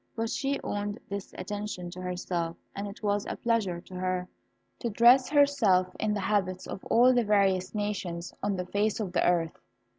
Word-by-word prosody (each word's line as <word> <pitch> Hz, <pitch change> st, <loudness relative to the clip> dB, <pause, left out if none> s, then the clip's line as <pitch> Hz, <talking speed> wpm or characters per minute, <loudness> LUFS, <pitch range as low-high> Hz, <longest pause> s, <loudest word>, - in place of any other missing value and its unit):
But 225 Hz, -1 st, -2 dB
she 275 Hz, +1 st, -1 dB
owed 205 Hz, +2 st, -3 dB
this 200 Hz, -1 st, -5 dB
attention 195 Hz, -2 st, -5 dB
to 185 Hz, -, -8 dB
herself, 180 Hz, -2 st, -3 dB, 0.2 s
and 200 Hz, +1 st, -4 dB
it 200 Hz, +2 st, -10 dB
was 205 Hz, 0 st, 0 dB
a -, -, -3 dB
pleasure 220 Hz, -7 st, 0 dB
to 185 Hz, -, -15 dB
her 185 Hz, 0 st, -2 dB, 0.5 s
to 235 Hz, -, -2 dB
dress 240 Hz, +4 st, +6 dB
herself 235 Hz, -12 st, +3 dB
in 215 Hz, -1 st, 0 dB
the -, -, -1 dB
habits 190 Hz, -2 st, 0 dB
of 190 Hz, -, -7 dB
all 250 Hz, +2 st, +5 dB
the 245 Hz, -1 st, +3 dB
various 195 Hz, -2 st, +2 dB
nations 190 Hz, -5 st, -3 dB
on 205 Hz, -1 st, 0 dB
the 180 Hz, -1 st, -3 dB
face 205 Hz, +4 st, 0 dB
of 195 Hz, -5 st, -3 dB
the -, -, +2 dB
earth. 170 Hz, -2 st, +1 dB
200 Hz, 185 wpm, -29 LUFS, 185-215 Hz, 0.5 s, dress